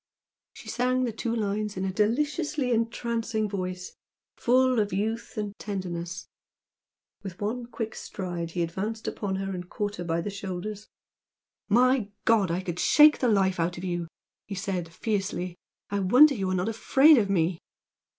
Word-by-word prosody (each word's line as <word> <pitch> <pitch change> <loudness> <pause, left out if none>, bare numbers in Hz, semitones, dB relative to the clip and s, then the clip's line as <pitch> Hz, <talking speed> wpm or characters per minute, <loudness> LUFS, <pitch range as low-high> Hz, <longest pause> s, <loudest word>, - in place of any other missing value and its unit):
She - - -13
sang 255 +1 +1
the 240 - 0
two 230 +1 -3
lines 210 -1 -2
in 185 - -1
a 190 - -2
deliciously 290 - 0
entrancing 230 -1 -1
voice, 185 -2 -4 0.4
full 255 0 +3
of 205 -1 0
youth 220 +5 -2
and 210 -1 -3
tenderness. 180 -3 -5 0.9
With 195 -2 -8
one 235 +3 -3
quick 225 -2 -5
stride 175 -3 -5
he 170 +1 -1
advanced 205 +7 -4
upon 195 -2 -2
her 195 0 -3
and 180 -1 -6
caught 205 -1 -3
her 175 - -4
by 170 0 -1
the 205 - -4
shoulders. 200 +2 -6 0.8
"My 245 0 +3 0.2
God, 215 -5 +4
I 170 +2 -1
could 175 -2 -5
shake 300 0 +6
the 255 - +2
life 190 -4 +2
out 170 +1 0
of 175 - -7
you!" 175 -2 -2 0.4
he 200 - -5
said, 185 -3 -3
fiercely 190 -2 -2 0.4
"I 200 - 0
wonder 255 +10 +6
you 195 -6 -2
are 185 - 0
not 185 +4 0
afraid 265 +6 +5
of 200 -3 0
me!" 170 -2 +1
205 Hz, 165 wpm, -27 LUFS, 185-230 Hz, 0.9 s, shake